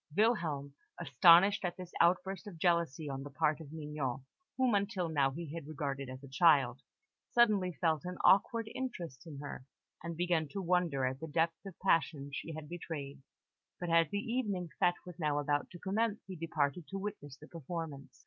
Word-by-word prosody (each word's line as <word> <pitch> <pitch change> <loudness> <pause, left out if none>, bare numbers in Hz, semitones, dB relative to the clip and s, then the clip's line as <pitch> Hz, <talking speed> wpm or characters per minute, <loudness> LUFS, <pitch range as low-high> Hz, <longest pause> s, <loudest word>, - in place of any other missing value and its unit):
Wilhelm, 165 -11 +1 0.3
astonished 170 - +6
at 175 -1 -2
this 180 -1 -8
outburst 185 +3 +2
of 185 -5 -8
jealousy 165 -3 +1
on 135 -1 -4
the 145 - -7
part 150 +2 +1
of 145 -2 -10
Mignon 150 -4 -4 0.3
whom 260 -3 +3
until 200 -3 0
now 140 -4 +2
he 155 +2 -6
had 165 -4 -6
regarded 140 -3 -4
as 130 +1 -9
a - - -9
child 135 -4 +4 0.5
suddenly 210 -7 +4
felt 160 -4 +1
an 180 0 -5
awakened 220 +3 +4
interest 180 - -5
in 150 -3 -8
her, 145 -2 -7 0.4
and 170 -1 -5
began 175 -3 +1
to 195 - -5
wonder 175 -7 +1
at 130 +1 -2
the 160 - -6
depth 165 +2 0
of 190 - -10
passion 160 -6 +1
she 160 - -5
had 155 -1 -7
betrayed; 145 -5 -6 0.6
but 175 -1 -3
as 165 -2 +5
the 205 - -2
evening 205 -6 -2
fête 175 - +5
was 180 -1 -10
now 150 -3 +1
about 145 0 0
to 175 - -10
commence, 210 +4 -1
he 190 - -7
departed 160 -1 -1
to 195 - -5
witness 190 -9 -6
the 155 - -14
performance. 160 -3 -7
165 Hz, 185 wpm, -33 LUFS, 145-185 Hz, 0.6 s, astonished